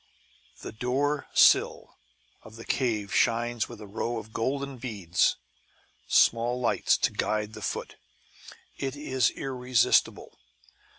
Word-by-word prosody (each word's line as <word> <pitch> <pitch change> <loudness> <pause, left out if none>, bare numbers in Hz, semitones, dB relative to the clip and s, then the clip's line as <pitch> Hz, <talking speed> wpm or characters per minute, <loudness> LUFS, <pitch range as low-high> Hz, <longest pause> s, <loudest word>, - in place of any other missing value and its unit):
The - - -6
door 135 +6 -1
sill - - +3 0.5
of 110 - -14
the 115 - -11
cave 110 -6 -1
shines 120 0 +1
with 120 -2 -10
a 105 - -9
row 115 +3 -3
of 110 0 -9
golden 140 +3 -2
beads 100 -8 0 0.7
(small 120 +2 +3
lights, 120 - +2
to - - 0
guide 105 0 -2
the 110 - -9
foot) - - -5 0.8
it 135 0 -3
is 130 -4 0
irresistible. 125 -3 0
120 Hz, 120 wpm, -27 LUFS, 110-130 Hz, 0.8 s, sill